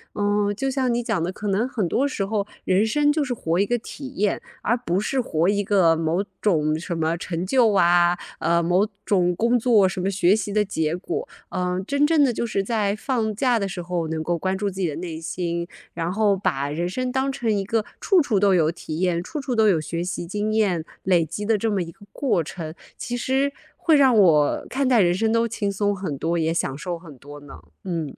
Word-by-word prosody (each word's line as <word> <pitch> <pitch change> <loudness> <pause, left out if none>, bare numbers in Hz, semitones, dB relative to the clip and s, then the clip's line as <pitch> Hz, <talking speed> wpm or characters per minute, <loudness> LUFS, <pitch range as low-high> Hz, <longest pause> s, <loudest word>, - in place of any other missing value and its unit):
嗯， 205 0 +1
就 270 +6 -1
像 260 -2 0
你 240 +1 -1
讲 220 -6 -1
的， 170 +2 -1
可 210 +2 -6
能 205 +5 +1
很 220 -9 -1
多 270 +10 +1
时 210 -8 -2
候 205 0 -1 0.2
人 190 +3 +2
生 295 +6 +2
就 300 -1 +1
是 255 - -2
活 170 -6 -1
一 200 - +3
个 240 +3 0
体 265 +4 -8
验， 205 0 0 0.2
而 230 - +1
不 190 -6 -1
是 265 +5 -1
活 165 -7 0
一 205 0 +1
个 185 -5 +4
某 165 +4 0 0.2
种 155 -6 +2
什 170 0 -4
么 160 +1 0
成 170 0 -4
就 230 0 +3
啊， 175 -1 +4 0.2
呃， 170 +1 +2
某 180 +4 +2 0.2
种 180 -3 +2
工 235 +4 +2
作 225 -5 +4
什 185 - -4
么 190 - 0
学 185 +1 +3
习 215 -1 -3
的 210 0 +3
结 160 -4 -1
果。 360 - -4 0.2
嗯， 180 0 -2
真 280 +3 +2
正 310 -1 +4
的 255 - +2
就 235 - -2
是 205 -4 -1
在 210 -2 0
放 220 -2 -1
假 245 0 +2
的 200 - -1
时 190 -2 -5
候， 175 -1 -2
能 160 0 -3
够 170 +1 -1
关 190 +2 -1
注 200 +1 -1
自 190 0 -8
己 180 - +1
的 145 - -5
内 165 -2 -5
心， 170 +1 -3 0.3
然 170 +1 -2
后 205 0 +2
把 140 -7 -1
人 170 +4 -2
生 255 +6 -2
当 265 +1 0
成 245 -5 -1
一 200 -2 0
个 225 0 0
处 380 -4 +4
处 225 -9 +1
都 200 0 +4
有 160 -2 +3
体 160 -1 -6
验， 180 -2 +1
处 305 - -5
处 270 -2 -3
都 220 -1 +4
有 185 -6 +4
学 165 +2 -3
习 175 -1 -4
经 210 +4 -2
验， 190 -7 +1 0.2
累 175 -3 +3
积 205 +7 -5
的 220 0 +2
这 225 +3 -1
么 200 -2 0
一 165 -1 -5
个 205 - -18
过 240 - +1
程。 160 0 -7 0.2
其 245 - -4
实 265 +3 0 0.3
会 320 - +3
让 265 -5 +5
我 160 -7 +4
看 270 0 0
待 245 -4 +5
人 175 -2 +3
生 220 +4 +1
都 230 +1 +2
轻 210 -3 -2
松 205 +1 0
很 180 -7 -4
多， 165 +4 -1
也 160 0 +1
享 140 -5 -2
受 175 +3 -4
很 165 -5 -13
多 145 +3 -11
呢， 145 -1 -12 0.3
嗯。 165 -6 -4
195 Hz, 255 characters per minute, -23 LUFS, 170-225 Hz, 0.3 s, 让